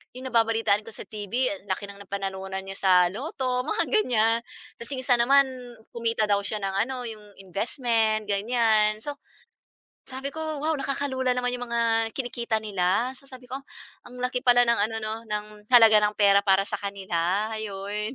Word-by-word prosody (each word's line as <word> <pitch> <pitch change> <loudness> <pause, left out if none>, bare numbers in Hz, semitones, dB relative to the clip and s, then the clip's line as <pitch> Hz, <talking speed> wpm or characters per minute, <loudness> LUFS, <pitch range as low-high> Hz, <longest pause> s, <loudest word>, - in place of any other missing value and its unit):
'yong 260 +1 -6
nababalitaan 225 -2 +2
ko 225 - -10
sa - - -9
TV 205 -2 -8 0.2
ang 195 -4 -4
laki 195 +2 -2
ng 200 0 -11
napanalunan 190 -1 -4
niya 195 - -6
sa 190 - +3 0.2
lotto, 250 - -2
mga 430 +10 0
ganyan. 230 - +2 0.4
Tapos, 235 - -10
'yong 260 -2 -4
isa 245 - +6
naman, 270 +4 +5 0.5
kumita 230 -2 0
daw 200 -1 +2
siya 215 +1 -3
ng 195 -1 -3
ano, 250 0 -5
'yong 210 -3 -11
investment, 220 +2 0
ganyan. 215 0 +2
So, 290 +6 -5 0.9
sabi 265 +1 -5
ko, 315 - -10 0.2
"Wow, 315 -1 0
nakakalula 265 -2 -1
naman 250 0 -1
'yong 245 0 -6
mga 235 0 0 0.3
kinikita 240 -3 -2
nila." 200 +3 +1
So, 275 - -17
sabi 255 -2 -13
ko, 265 - -3 0.5
"Ang 250 0 -9
laki 250 0 0
pala 245 -1 +6
ng 235 0 +2
ano 215 +2 0
'no, 215 0 -2
ng 210 -1 -3 0.3
halaga 225 -3 +8
ng 210 0 +1
pera 200 -1 +6
para 195 0 +5
sa - - -3
kanila," 195 0 -1
'yon. 210 +2 -4
225 Hz, 175 wpm, -26 LUFS, 200-250 Hz, 0.9 s, halaga